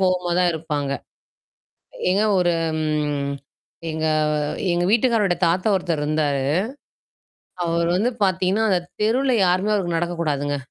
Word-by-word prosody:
கோவமா 180 -2 +1
தான் 180 -1 +3
இருப்பாங்க. 150 -3 -3 1.2
எங்க 195 +3 +2 0.2
ஒரு 175 -1 +2 0.3
ம். 150 -2 -1 0.6
எங்க 160 0 -2 0.7
எங்க 175 0 +1
வீட்டுக்காரரோட 220 -5 +2
தாத்தா 185 +5 +1
ஒருத்தர் 170 -4 -2
இருந்தாரு. 150 -2 0 1.2
அவர் 170 0 0
வந்து 230 +6 +1
பார்த்தீங்கன்னா 190 +3 +1
அந்த 185 -2 +3 0.2
தெருவுல 255 +5 +2
யாருமே 185 +4 +1
அவருக்கு 175 -4 -1
நடக்கக்கூடாதுங்க. 155 -4 -1
175 Hz, 110 wpm, -22 LUFS, 155-190 Hz, 1.2 s, தான்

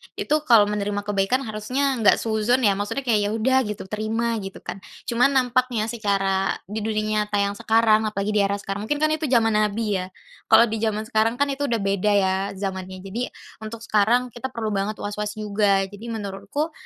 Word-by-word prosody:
Itu 305 - +1
kalau 210 -4 +6
menerima 205 0 -2
kebaikan, 205 +6 0
harusnya 250 +5 -1
enggak 210 -3 +6
suudzon 225 +3 0
ya, 200 -2 +3
maksudnya 205 +7 -3
kayak, 215 -5 +2
ya - - -2
udah 260 +4 +3
gitu, 210 -1 -5
terima, 225 +2 -1
gitu 195 -1 -8
kan. - - -6 0.2
Cuman 250 +4 +2
nampaknya, 250 -3 +1
secara 195 -4 0
di 210 +3 -5
dunia 215 0 -1
nyata 210 - -3
yang 200 0 +1
sekarang, 220 -1 +3
apalagi 210 0 -2
di 210 - +2
era 200 0 +2
sekarang. 200 +1 -5
Mungkin 295 +3 -1
kan 310 - +3
itu 310 0 -1
zaman 230 -3 +3
nabi, 210 -1 +1
ya. 185 - -5 0.4
Kalau - - +7
di 225 -1 -1
zaman 215 -1 -1
sekarang 220 0 +1
kan, 285 +3 +1
itu 285 +1 -2
udah 235 - +1
beda 200 +1 +1
ya 190 -1 +3 0.2
zamannya. 190 -1 -5
Jadi, 225 +6 -3 0.3
untuk 220 +1 -8
sekarang 235 +4 +2
kita 240 +3 -5
perlu 230 -4 -4
banget 200 +1 -1
was-was 210 +1 -4
juga. 205 -2 +1
Jadi 205 +4 -9
menurutku, 225 +8 -4
215 Hz, 190 wpm, -23 LUFS, 205-235 Hz, 0.4 s, Kalau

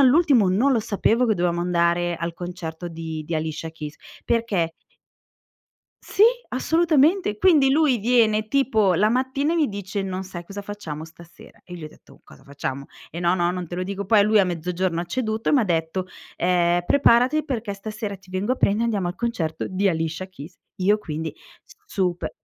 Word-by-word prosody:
all'ultimo 270 - +5
non 215 +10 +3
lo 250 - +3
sapevo 225 +3 +1
che 220 - +2
dovevamo 175 -1 0
andare 175 0 +1
al 170 0 -4
concerto 175 -1 -6
di 160 -2 -6
di 165 +2 -4
Alicia 160 +1 -3
Keys 150 -2 -8 0.3
perché 205 -8 0 1.3
Sì 400 - +1 0.3
assolutamente, 320 - +2
quindi 295 - +5
lui 295 -3 +3
viene 215 -1 +2
tipo 220 -8 +2
la 210 +5 +3
mattina 265 +6 0
e - - 0
mi 310 -3 +2
dice: 200 -1 -4
"Non 190 -1 -4
sai 180 -2 -8
cosa 200 +3 -7
facciamo 200 -7 -7
stasera." 165 +1 -16
E 180 - -10
gli 170 - -9
ho - - -6
detto: - - -20
"Cosa 70 - -17
facciamo?" 140 -1 -5 0.2
"Ehm, 170 - -6
no, 175 +1 +3
no 175 -1 +1
non 180 0 -4
te 175 - -7
lo 180 - -2
dico." 200 +2 -4
Poi 205 +1 +5
lui 215 +1 +4
a 195 - +5
mezzogiorno 175 0 -2
ha - - -3
ceduto 220 +3 -2
e - - +3
m'ha 265 -6 +4
detto: 170 +1 -1 0.3
"Ehm, 175 0 +2
preparati 265 +4 +4
perché 235 -7 -3
stasera 210 0 -6
ti 190 0 -23
vengo 190 +6 -1
a 260 - -1
prendere 210 +4 +2
andiamo 205 -6 0
al 175 - -4
concerto 185 -8 -2
di 195 +1 0
Alicia 165 +1 -2
Keys." 170 -1 -12 0.2
Io 205 +2 +2
quindi 160 -4 -5 0.5
super 180 - -1
190 Hz, 185 wpm, -23 LUFS, 170-230 Hz, 1.3 s, all'ultimo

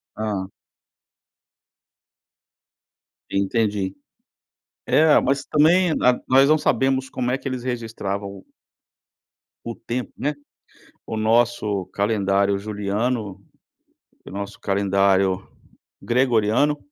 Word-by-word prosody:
Hã. 100 -3 -3 2.8
Entendi. 100 -1 0 0.9
É, 155 -1 +5
mas 140 +1 0
também 165 +4 +4
a 125 -1 +4
nós 135 +2 +5
não 155 - +5
sabemos 130 -1 +1
como 125 -2 -2
é 130 - 0
que - - -7
eles 130 -2 -4
registravam 110 -5 -4
o - - -16 1.2
O 115 -1 -5
tempo, 120 +2 -5
né? 145 +2 -1 0.7
O 110 - -5
nosso 110 -3 +1
calendário 100 -1 +1
Juliano, 105 +1 -3 0.8
o - - -11
nosso 100 +1 -6
calendário 95 -1 +1 0.5
Gregoriano 125 +3 +2
110 Hz, 90 wpm, -22 LUFS, 100-130 Hz, 2.8 s, É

